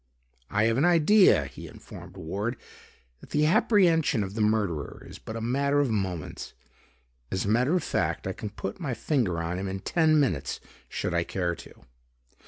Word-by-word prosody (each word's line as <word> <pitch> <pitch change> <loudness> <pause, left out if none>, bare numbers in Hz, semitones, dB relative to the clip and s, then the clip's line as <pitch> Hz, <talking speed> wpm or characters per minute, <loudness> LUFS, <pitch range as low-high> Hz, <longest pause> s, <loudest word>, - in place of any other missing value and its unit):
"I 105 +1 +1
have 115 +2 +2
an - - +3
idea," 175 +4 +5
he - - -10
informed - - -12
Ward, 100 +9 -3 0.6
"that - - -15
the 150 +1 +2
apprehension 165 - +3
of 95 0 -6
the 110 - -2
murderer 105 -8 -1
is - - -11
but 110 - -8
a 115 - -4
matter 140 +5 +1
of 140 -5 +1
moments. 95 -7 -3 0.8
As 95 - -2
a - - -1
matter 125 +9 +3
of 180 - 0
fact, - - -1
I - - -2
can 105 - -6
put 100 -1 -6
my 140 -8 -3
finger 115 - 0
on 85 +2 -3
him 95 - -3
in 95 0 -3
ten 155 - +3
minutes 90 - 0 0.3
should 90 - -3
I 85 0 +2
care 90 -1 -2
to." - - -13
115 Hz, 185 wpm, -27 LUFS, 95-150 Hz, 0.8 s, idea